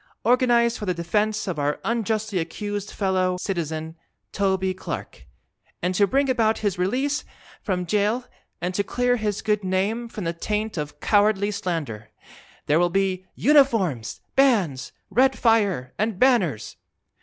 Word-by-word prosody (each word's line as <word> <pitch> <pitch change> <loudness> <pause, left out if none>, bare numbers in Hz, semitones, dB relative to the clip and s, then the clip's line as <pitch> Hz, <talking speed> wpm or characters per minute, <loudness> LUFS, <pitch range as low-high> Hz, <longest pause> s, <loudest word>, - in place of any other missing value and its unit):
Organized 240 0 +3
for 210 - -5
the 180 - 0
Defense 210 +6 0
of 175 -5 -3
our 145 +1 0
Unjustly 220 -3 -1
Accused 205 +4 -4
Fellow 185 -2 0
Citizen, 160 -4 -3 0.4
Toby 190 -2 0
Clark! 65 - -7 0.5
And 180 +1 -1
to 200 +2 +3
Bring 275 +4 +2
About 225 -4 +2
his 195 -3 0
Release 260 +10 0 0.4
from 180 -3 -2
Jail 210 +6 0 0.3
and 180 +1 -2
to 200 - 0
Clear 245 +4 +1
his 210 -3 -2
Good 210 -2 +1
Name 200 +6 -1
from 210 - -6
the 165 0 -1
Taint 210 +5 -2
of 150 -3 -5
Cowardly 205 -1 +3
Slander! 150 - -4 0.6
There 150 +3 +3
will 175 0 +3
be 185 0 -1
UNIFORMS! 225 - +2
BANDS! 205 - +2 0.2
RED 265 +2 +3
FIRE! 200 - +2
and 215 -2 0
BANNERS! 195 - +2
200 Hz, 145 wpm, -24 LUFS, 180-225 Hz, 0.6 s, Organized